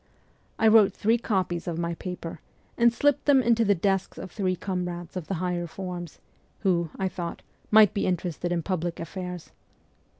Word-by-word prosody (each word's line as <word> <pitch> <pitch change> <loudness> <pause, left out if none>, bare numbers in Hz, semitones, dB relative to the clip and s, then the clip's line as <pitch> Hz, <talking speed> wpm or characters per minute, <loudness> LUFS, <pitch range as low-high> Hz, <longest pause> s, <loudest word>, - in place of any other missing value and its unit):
I 225 - +4
wrote 215 -3 +6
three 225 +3 +2
copies 185 -6 -1
of 170 -2 -2
my 170 0 -1
paper, 170 -2 -6 0.4
and 235 0 +5
slipped 290 +4 +1
them 275 -3 +5
into 230 -1 +3
the 205 -2 +3
desks 195 +1 0
of 185 - -7
three 185 -3 0
comrades 180 -2 -4
of 180 -4 -5
the 195 - -2
higher 175 0 -2
forms, 175 -2 -6 0.4
who, 175 -4 +1
I 190 - 0
thought, 175 -2 -5 0.3
might 215 -2 +7
be 200 - 0
interested 175 -1 -2
in 170 -2 0
public 175 -2 -2
affairs. 180 +1 -6
185 Hz, 170 wpm, -26 LUFS, 175-205 Hz, 0.4 s, might